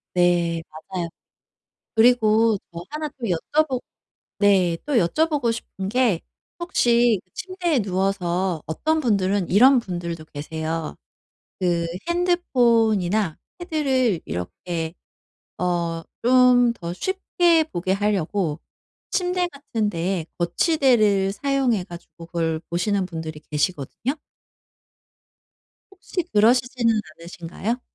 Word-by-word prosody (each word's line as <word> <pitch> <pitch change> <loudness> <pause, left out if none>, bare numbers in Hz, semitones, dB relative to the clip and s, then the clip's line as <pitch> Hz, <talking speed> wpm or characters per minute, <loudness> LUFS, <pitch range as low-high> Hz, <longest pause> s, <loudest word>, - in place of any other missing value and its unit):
네 175 -2 +2
맞아요. 170 +2 -6 0.9
그리고 225 -2 +4 0.2
저 170 - -5
1 305 +1 -4
또 255 -4 -8
여쭤보 255 - 0 0.6
네 190 -4 +3
또 295 - -1
여쭤보고 265 - +2
싶은 195 -4 -6
게 235 -7 +2 0.4
혹시 240 - +3
침대에 355 -7 -1
누워서 185 -3 -1
어떤 315 - 0
분들은 200 - +1
이런 255 +7 +6
분들도 170 -5 -5
계세요. 160 +2 -4 0.6
그 170 -2 +1 0.2
핸드폰이나 230 - +2 0.2
패드를 265 - 0
이렇게 160 - -4 0.6
어 170 -2 -1 0.2
좀 250 -1 +5
더 170 -4 -6
쉽게 345 - +2
보게 185 +2 -1
하려고 195 -5 0 0.5
침대 360 -1 0
같은 280 -8 -3
데에 175 -2 -2
거치대를 210 - +3
사용해 260 -6 0
가지고 170 -2 -12
그걸 165 -2 -1
보시는 195 +2 0
분들이 160 -3 -6
계시거든요. 155 - -2 1.8
혹시 375 -2 -4
그러시지는 235 +1 +3 0.2
않으신가요? 175 +7 -5
205 Hz, 225 characters per minute, -23 LUFS, 170-255 Hz, 1.8 s, 이런